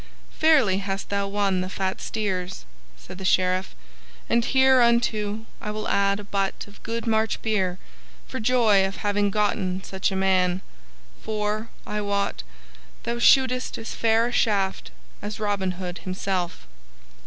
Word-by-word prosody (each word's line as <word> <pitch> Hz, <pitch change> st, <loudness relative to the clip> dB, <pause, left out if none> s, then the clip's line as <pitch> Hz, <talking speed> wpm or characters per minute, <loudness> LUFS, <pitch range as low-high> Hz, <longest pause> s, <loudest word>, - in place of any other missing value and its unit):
"Fairly 275 Hz, -12 st, +4 dB
hast 195 Hz, 0 st, -4 dB
thou 200 Hz, 0 st, 0 dB
won 195 Hz, -2 st, 0 dB
the 185 Hz, -, -3 dB
fat 190 Hz, -1 st, -2 dB
steers," 185 Hz, -, -3 dB, 0.3 s
said 60 Hz, -, -11 dB
the -, -, -6 dB
Sheriff, 185 Hz, 0 st, +1 dB, 0.5 s
"and 235 Hz, -, +2 dB
hereunto 235 Hz, -5 st, +3 dB, 0.2 s
I 210 Hz, -, -4 dB
will 215 Hz, 0 st, -3 dB
add 200 Hz, 0 st, +2 dB
a -, -, -7 dB
butt 195 Hz, -1 st, -2 dB
of 205 Hz, -, -16 dB
good 230 Hz, +1 st, -4 dB
March 220 Hz, -1 st, +1 dB
beer, 190 Hz, -5 st, 0 dB, 0.5 s
for -, -, -5 dB
joy 220 Hz, -4 st, +4 dB
of 195 Hz, 0 st, -2 dB
having 205 Hz, 0 st, +2 dB
gotten 195 Hz, -2 st, 0 dB
such 190 Hz, +1 st, -2 dB
a -, -, -2 dB
man; 185 Hz, -1 st, +2 dB, 0.6 s
for, 215 Hz, +1 st, -2 dB, 0.2 s
I 210 Hz, 0 st, -3 dB
wot, 200 Hz, -, -1 dB, 0.6 s
thou 235 Hz, 0 st, -2 dB
shootest 255 Hz, +1 st, +4 dB
as 225 Hz, -, -6 dB
fair 225 Hz, 0 st, +3 dB
a 240 Hz, -, -2 dB
shaft 200 Hz, -5 st, +1 dB, 0.3 s
as 210 Hz, +1 st, -5 dB
Robin 200 Hz, -3 st, 0 dB
Hood 180 Hz, 0 st, -6 dB
himself." 185 Hz, -, -3 dB
205 Hz, 145 wpm, -25 LUFS, 190-220 Hz, 0.6 s, Fairly